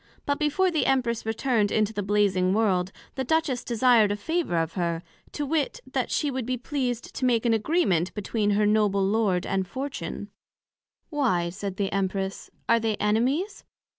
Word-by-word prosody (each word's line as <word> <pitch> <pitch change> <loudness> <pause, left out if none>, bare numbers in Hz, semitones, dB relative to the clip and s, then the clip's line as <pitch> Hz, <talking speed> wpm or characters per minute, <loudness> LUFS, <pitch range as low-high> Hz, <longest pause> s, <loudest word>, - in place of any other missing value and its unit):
But 285 0 0
before 330 +5 +2
the 315 - +1
Empress 235 -4 0
returned 225 -2 +1
into 215 0 +1
the 205 - -2
Blazing 195 -2 +2
world, 190 -4 +1 0.2
the 265 - -2
Duchess 280 -2 0
desired 235 -3 +4
a - - 0
Favour 320 - -1
of 165 0 -1
her, 170 -2 -2 0.3
to 295 - -2
wit, 310 - -1
That - - -2
she 295 -2 0
would 260 -3 -3
be 255 0 -1
pleased 250 -2 -3
to - - -5
make 245 -2 +2
an 235 - +4
Agreement 215 - +1
between 210 0 -1
her 210 - +3
Noble 205 -2 +2
Lord, 195 -3 +1
and 190 -1 -1
Fortune. 265 +6 -5 0.8
Why, 185 - +1
said 195 +1 -5
the 195 -1 -1
Empress, 195 0 -2 0.2
are 230 0 +4
they 220 -1 0
Enemies? 255 - 0
220 Hz, 170 wpm, -26 LUFS, 195-265 Hz, 0.8 s, desired